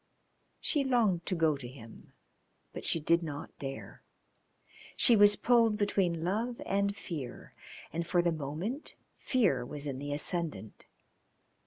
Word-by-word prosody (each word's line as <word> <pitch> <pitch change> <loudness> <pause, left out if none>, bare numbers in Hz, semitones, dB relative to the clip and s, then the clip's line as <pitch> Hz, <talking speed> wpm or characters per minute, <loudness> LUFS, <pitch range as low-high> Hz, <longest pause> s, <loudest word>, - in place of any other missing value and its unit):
She 290 -3 +2
longed 225 -10 +1
to 185 - 0
go 160 -3 +2
to 135 -3 -8
him, 120 -3 -13 0.6
but - - -7
she 165 - +2
did 170 +3 +2
not 145 -3 -7
dare. 135 -1 -7 1.0
She 240 - +6
was 205 0 +7
pulled 230 -2 +3
between 190 -5 0
love 225 +7 -1
and 200 +1 0
fear, 145 -11 -7 0.4
and 170 +1 -3
for 175 0 +2
the 170 - +2
moment 160 - -3 0.2
fear 195 - +1
was 145 +3 -5
in 135 -2 -4
the 145 +1 -5
ascendant. 150 - -2
170 Hz, 140 wpm, -31 LUFS, 145-205 Hz, 1.0 s, was